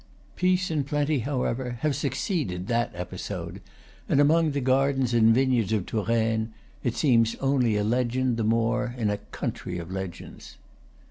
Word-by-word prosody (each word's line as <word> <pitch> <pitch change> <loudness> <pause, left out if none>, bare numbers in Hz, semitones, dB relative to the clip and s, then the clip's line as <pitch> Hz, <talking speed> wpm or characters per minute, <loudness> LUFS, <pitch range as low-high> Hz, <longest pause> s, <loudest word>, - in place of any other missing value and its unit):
Peace 180 -1 +1
and 150 -3 0
plenty, 145 0 +1
however, 125 -1 -2
have 150 -3 +1
succeeded 130 - -2
that 120 +1 0
episode; 90 0 -6 0.5
and - - +3
among 160 +3 +4
the 140 -1 -1
gardens 135 -1 +2
and 115 -1 +5
vineyards 125 -6 +2
of 105 -5 0
Touraine 110 0 0 0.3
it 120 - -1
seems, 115 -6 +3
only 130 -5 +1
a 105 - +1
legend 125 +2 0
the 115 - 0
more 115 +3 +1
in 110 -4 0
a 105 - -1
country 90 -3 -5
of 85 +1 -7
legends. 95 -2 -7
120 Hz, 150 wpm, -26 LUFS, 110-135 Hz, 0.5 s, and